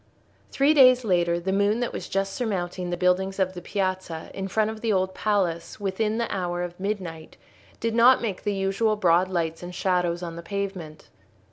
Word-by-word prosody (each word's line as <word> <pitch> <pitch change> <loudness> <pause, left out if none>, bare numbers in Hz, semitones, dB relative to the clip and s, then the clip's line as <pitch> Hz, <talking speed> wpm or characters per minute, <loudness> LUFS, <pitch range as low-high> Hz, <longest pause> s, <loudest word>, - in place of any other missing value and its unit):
Three 280 +3 +3
days 255 -4 +6
later 175 -3 +2
the 190 +2 -2
moon 200 +3 +2
that 245 - -2
was - - -6
just 195 0 -1
surmounting 180 -6 -3
the 175 - -2
buildings 185 +2 +1
of 190 -1 0
the 175 - -8
piazza 185 -4 -3
in 195 0 -4
front 215 +2 +1
of 220 0 -9
the 230 - 0
Old 190 -1 +1
Palace 190 -6 -1
within 210 +2 -1
the 235 - 0
hour 175 -2 -2
of 175 0 -7
midnight, 185 -6 -5 0.4
did 230 0 -1
not 240 +3 +6
make 210 -6 -3
the 205 -1 -1
usual 195 +3 +1
broad 180 -2 +3
lights 165 -3 -2
and 180 0 -8
shadows 180 -2 0
on 170 -1 -6
the - - -6
pavement. 190 -5 -5
190 Hz, 195 wpm, -25 LUFS, 175-210 Hz, 0.4 s, days